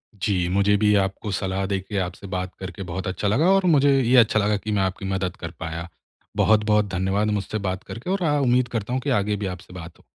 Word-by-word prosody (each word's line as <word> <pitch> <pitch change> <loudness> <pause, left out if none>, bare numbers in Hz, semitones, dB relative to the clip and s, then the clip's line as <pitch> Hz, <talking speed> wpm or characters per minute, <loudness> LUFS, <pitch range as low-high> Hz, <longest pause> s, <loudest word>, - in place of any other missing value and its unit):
जी, 100 -4 0
मुझे 100 +2 +3
भी 105 0 +3
आपको 95 +2 -3
सलाह 95 0 -2
देके 95 +1 -3
आपसे 90 +3 -9
बात 90 -1 -4
करके 95 +1 -6
बहुत 90 +1 -5
अच्छा 95 +2 -2
लगा 145 - +3
और 195 -1 +3
मुझे 140 0 +4
ये 125 +1 +3
अच्छा 110 -2 +5
लगा 105 0 +1
कि 105 +1 -5
मैं 105 -2 +1
आपकी 95 +1 -3
मदद 95 -2 -2
कर 85 - -6
पाया। 85 -1 -5 0.5
बहुत-बहुत 105 -1 +3
धन्यवाद 95 +3 0
मुझसे 100 +2 -4
बात 95 +1 -4
करके 120 +10 -8
और 195 -1 0
आ 150 -3 +2
उम्मीद 125 -2 +2
करता 115 +3 -4
हूँ 130 - 0
कि 145 - -3
आगे 105 +1 -1
भी 105 0 -4
आपसे 90 0 -15
बात 85 -2 -10
हो। - - -22
100 Hz, 230 wpm, -23 LUFS, 95-110 Hz, 0.5 s, अच्छा